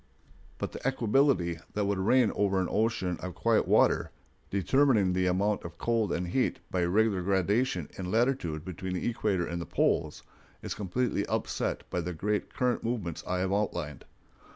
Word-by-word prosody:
But - - -3
the - - -7
equability 125 - +2
that 105 -1 0
would 100 -1 0
reign 115 +4 +4
over 100 -2 +1
an 90 - 0
ocean 105 -5 0
of 90 -3 -6
quiet - - +2
water, - - +3 0.4
determining 105 -1 +3
the 90 0 +1
amount 100 +3 +1
of 85 0 -8
cold 115 -3 0
and 90 0 -2
heat 130 +8 +1
by 90 -2 +1
regular 100 +1 +2
gradation 95 - +1
in 90 -1 -3
latitude 110 - 0
between 95 0 -5
the 90 - -2
equator 105 -6 0
and 85 0 -4
the - - -6
poles, - - 0 0.4
is - - -3
completely 105 +4 -1
upset - - -2
by 90 - 0
the 90 +2 -4
great 105 +6 -2
current 125 -2 0
movements 105 -9 -3
I 90 0 0
have 95 +1 0
outlined. 85 -8 -2
95 Hz, 170 wpm, -29 LUFS, 90-115 Hz, 0.4 s, reign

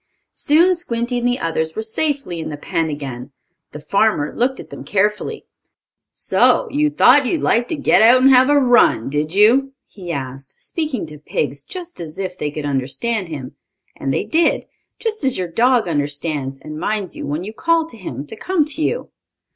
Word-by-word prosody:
Soon 340 +4 +3
Squinty 245 -7 -2
and 240 - 0
the 245 0 +1
others 160 -1 -2
were 220 - -3
safely 275 - -2
in 160 - -5
the 150 - -6
pen 160 +2 -2
again. 135 -3 -6 0.4
The 150 - -8
farmer 195 -3 +1
looked 260 +3 0
at - - -11
them - - -8
carefully. 210 - -1 0.7
"So, - - +2
you 300 +1 +2
thought 290 -2 +5
you'd 330 - -1
like 240 +1 +2
to 325 - -2
get 285 - +3
out 235 +3 +7
and 270 +1 +6
have 260 +1 +6
a 290 - +4
run, 245 - +4
did 150 +4 -2
you?" 255 +7 +4
he 180 -4 -8
asked, 135 -2 -6
speaking 300 - -3
to 150 -1 -10
pigs 145 -1 -3
just 355 - -9
as 160 -2 -7
if 185 -2 -4
they 150 -5 -3
could 150 0 -5
understand 145 - -2
him. 140 -6 -7 0.4
And 135 - -3
they - - 0
did, 330 +1 +1 0.3
just 435 -6 -3
as 265 -2 0
your 185 -1 -2
dog 240 +4 +2
understands, 145 -2 -2
and 150 +2 -8
minds 205 -1 -2
you - - -6
when 150 +5 -3
you 215 +3 -7
call 330 +5 +1
to 320 - -11
him 145 - -7
to 185 - -8
come 345 - 0
to 305 +1 -2
you. 475 +10 -2
210 Hz, 195 wpm, -19 LUFS, -, 0.7 s, out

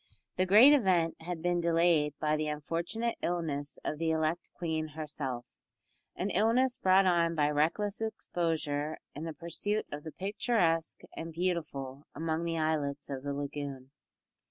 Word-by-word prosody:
The 185 - +1
great 225 +10 +9
event 180 - +2
had 170 0 -5
been 175 0 +1
delayed 165 -3 +3
by 155 0 +1
the 155 0 -1
unfortunate 170 +10 -2
illness 155 -5 -2
of 150 - -2
the 165 -1 +1
elect 160 +2 0
queen 160 -2 -2
herself 145 -5 -5 0.7
an 195 +2 -2
illness 235 +6 +2
brought 190 +1 +5
on 170 -2 +3
by 150 -1 +2
reckless 195 +9 0
exposure 160 -8 -2 0.2
in 150 +3 -6
the 165 - -4
pursuit 205 +6 -2
of 145 0 -6
the 160 - -6
picturesque 185 -4 0
and 165 0 -5
beautiful 155 -6 -3
among 160 +1 -1
the 165 -1 -1
islets 145 -3 -1
of 135 -1 -4
the 140 +1 -3
lagoon. 140 -2 -5
165 Hz, 150 wpm, -31 LUFS, 150-180 Hz, 0.7 s, great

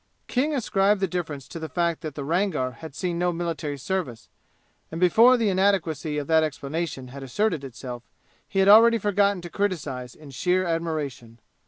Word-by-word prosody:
King 290 +4 0
ascribed 205 -4 +2
the 190 - +1
difference 160 -6 -4
to 165 - -8
the 160 -1 -6
fact 170 +3 -1
that 155 -3 -6
the 145 - -5
Rangar 160 -4 0
had 160 -4 -9
seen 175 -1 -2
no 175 0 +1
military 165 -4 -3
service, 145 -5 -4 0.6
and 165 - -5
before 230 +8 +6
the 225 -3 +1
inadequacy 175 -6 +1
of 145 - -2
that 160 +2 +4
explanation 145 -2 -4
had 135 +2 -9
asserted 160 - -1
itself 125 -1 -7 0.5
he 195 - -6
had 195 0 +4
already 230 +3 +8
forgotten 200 -2 +1
to 175 - -7
criticize 145 - -3
in 150 -2 -13
sheer 180 +7 +1
admiration. 155 -9 -3
165 Hz, 175 wpm, -25 LUFS, 145-195 Hz, 0.6 s, already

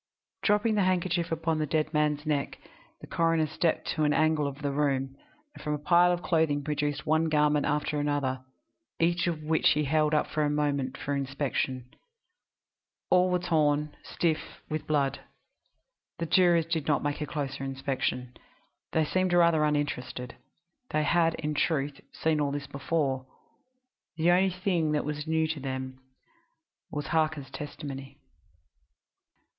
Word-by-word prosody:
Dropping 210 +2 +2
the 210 - +2
handkerchief 175 -2 0
upon 165 -1 0
the 155 - 0
dead 155 +2 0
man's 150 0 +1
neck, 145 -2 -1 0.4
the - - -8
coroner 165 -1 +1
stepped 160 +2 0
to 155 - 0
an 150 0 +3
angle 155 -2 +2
of 140 +1 -7
the 140 - 0
room, 135 -2 0 0.4
and - - -12
from 150 0 -1
a - - -3
pile 175 +4 +4
of 175 -1 -2
clothing 155 -4 +1
produced 150 -1 -2
one 160 +1 +2
garment 150 -2 +2
after 150 0 0
another, 140 -3 -1 0.6
each 170 +1 +2
of 160 -3 -2
which 160 +1 +3
he 150 - 0
held 155 +1 +2
up 150 - 0
a 150 -1 +2
moment 140 -3 -1
for 145 - -2
inspection. 135 -2 -2 1.3
All 180 0 +5
were 180 - +2
torn, 150 -4 +1
and - - -24
stiff 160 -2 -2
with 155 0 -3
blood. 140 -3 +1 1.0
The 170 - -2
jurors 170 -1 +4
did 165 -2 -2
not 145 -3 +2
make 145 +1 -2
a 150 - -2
closer 140 -2 -4
inspection. 135 -2 -2 0.6
They 160 -1 +3
seemed 185 +3 0
rather 170 -3 +4
uninterested. 140 -4 -2 0.5
They 155 - +1
had, 165 +2 +3
in 150 -1 -3
truth, 145 -2 0
seen 155 -1 0
all 145 - +1
this 140 0 -4
before; 140 -2 -1 0.9
the 170 +2 +4
only 185 +2 +4
thing 180 -4 0
that 150 - 0
was 150 +1 -4
new 160 0 +2
to 155 -2 -3
them 130 -1 -5 0.9
being 150 - -3
Harker's 150 -1 0
testimony. 140 -2 -7
150 Hz, 155 wpm, -28 LUFS, 140-165 Hz, 1.3 s, All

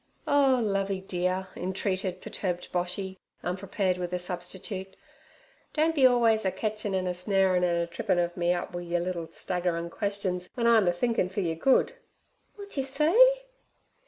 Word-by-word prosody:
'Oh, 275 -3 +4
Lovey 195 -2 0
dear' 185 0 -2
entreated 185 0 -2
perturbed 180 -2 -4
Boshy, 180 +2 -3 0.3
unprepared 185 0 -1
with 175 -1 -3
a - - +1
substitute, 185 +2 -5 0.8
'don't 320 +1 +3
be 270 -4 +6
always 230 -3 +3
a 190 - +1
ketchin' 210 +1 -2
an' 185 -1 0
a 180 - -1
snarin' 185 0 +2
an' 175 -1 +2
a 170 0 +1
trippin' 185 +2 -1
ov 175 0 0
me 175 -1 +1
up 180 0 -2
wi' 175 - -4
yer 175 0 -1
liddle 170 -1 -3
staggerin' 170 0 -3
questions 190 -2 -2
w'en 240 -2 -1
I'm 225 -5 +5
a - - +5
thinkin' 185 0 0
fer 195 +2 -2
yer 170 -3 0
good.' 265 - +3 0.6
'Wot 405 -5 -9
yer 270 - +1
say?' 415 - +4
190 Hz, 165 wpm, -28 LUFS, 180-220 Hz, 0.8 s, be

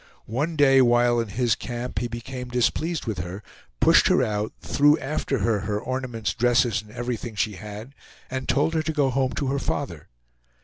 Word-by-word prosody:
One 145 +9 -2
day 135 -2 +6
while 120 -1 +4
in 115 - -1
his 115 +3 +1
camp 120 -2 -4
he 120 - -2
became 125 +2 -6
displeased 140 +6 0
with 110 -7 -3
her, 90 +5 -6 0.4
pushed - - +6
her - - +4
out, 105 0 -1
threw 145 +2 +3
after 135 0 -2
her 110 0 +1
her 105 +1 -2
ornaments, 125 -2 -3
dresses, 120 -3 +2
and 105 - -18
everything 120 0 -4
she 105 +1 0
had, 105 +5 -9 0.3
and 130 0 -5
told 150 +4 +2
her 160 - +1
to 160 0 -2
go 140 -3 +2
home 130 0 0
to 140 - -2
her 140 +1 0
father. 125 - -4
120 Hz, 185 wpm, -24 LUFS, 110-135 Hz, 0.4 s, day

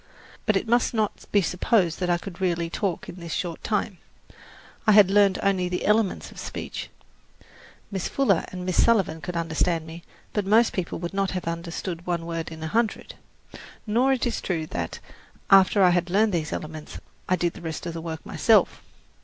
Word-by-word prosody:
But 215 - +3
it 195 - 0
must 240 +1 +2
not 215 -2 -1
be 200 -2 +4
supposed 180 0 +1
that 180 -1 -1
I 175 - +3
could 180 0 -9
really 170 -2 0
talk 190 -3 -2
in 175 - -9
this 170 -2 -8
short 175 -3 -4
time. 210 -3 -1 0.9
I 215 - +7
had 200 -2 +7
learned 200 -2 +4
only 190 -3 +1
the 180 - -2
elements 210 -1 +1
of - - -11
speech. - - -6 1.0
Miss 190 -2 -2
Fuller 230 -11 +2
and 180 -1 -6
Miss 185 -1 +3
Sullivan 190 -8 +2
could 180 - -5
understand 165 0 0
me, 165 +1 -9 0.3
but 210 - 0
most 220 +4 +4
people 185 -3 -3
would 170 +2 -5
not 195 -1 0
have 180 - -5
understood 170 +1 -4
one 170 -2 -1
word 165 -1 -4
in 160 0 -8
a - - -2
hundred. 220 +5 -1 0.7
Nor 245 +5 +3
is 255 - -1
it 240 - -1
true 165 -4 -2
that, 85 - -4 0.5
after 195 +1 +6
I 180 - +6
had 175 0 +1
learned 210 +3 +3
these 160 -3 -1
elements, 155 0 -6 0.3
I 185 - +4
did 175 -1 -1
the - - -11
rest 160 -1 -5
of 170 - -4
the 165 - -5
work 160 -1 -6
myself. - - +3
180 Hz, 195 wpm, -25 LUFS, 170-205 Hz, 1.0 s, I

